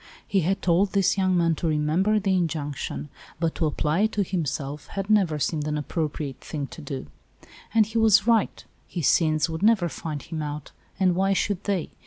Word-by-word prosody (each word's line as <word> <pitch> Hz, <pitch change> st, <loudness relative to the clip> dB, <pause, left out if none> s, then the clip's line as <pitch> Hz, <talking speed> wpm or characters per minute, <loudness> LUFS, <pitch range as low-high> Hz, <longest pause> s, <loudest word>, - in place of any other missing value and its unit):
He 195 Hz, -, +2 dB
had 190 Hz, +3 st, 0 dB
told 185 Hz, +3 st, +2 dB
this 195 Hz, -2 st, +3 dB
young 185 Hz, -2 st, +2 dB
man 170 Hz, -1 st, +3 dB
to 170 Hz, -, -1 dB
remember 160 Hz, +8 st, +2 dB
the 195 Hz, -1 st, +1 dB
injunction, 150 Hz, -4 st, -2 dB, 0.3 s
but 165 Hz, -1 st, 0 dB
to 160 Hz, -, 0 dB
apply 150 Hz, +2 st, 0 dB
it 220 Hz, +2 st, +2 dB
to 205 Hz, -, +1 dB
him 180 Hz, -3 st, -2 dB
self 140 Hz, +1 st, -4 dB
had 195 Hz, +1 st, -3 dB
never 190 Hz, -8 st, +3 dB
seemed 150 Hz, +1 st, -1 dB
an 150 Hz, 0 st, -1 dB
appropriate 150 Hz, -2 st, -3 dB
thing 145 Hz, -3 st, -4 dB
to -, -, -9 dB
do. 135 Hz, -2 st, -5 dB, 0.7 s
And 220 Hz, -1 st, +4 dB
he 220 Hz, +2 st, -2 dB
was 215 Hz, -3 st, +5 dB
right: 230 Hz, -3 st, +1 dB, 0.2 s
his 170 Hz, -5 st, -1 dB
sins 155 Hz, -2 st, +3 dB
would 160 Hz, -1 st, -5 dB
never 205 Hz, -5 st, +4 dB
find 150 Hz, -2 st, -5 dB
him 160 Hz, -2 st, -5 dB
out, 150 Hz, -1 st, -5 dB, 0.3 s
and 185 Hz, -2 st, +4 dB
why 195 Hz, +2 st, +2 dB
should 200 Hz, 0 st, -1 dB
they? 195 Hz, -5 st, -1 dB
170 Hz, 200 wpm, -25 LUFS, 150-195 Hz, 0.7 s, was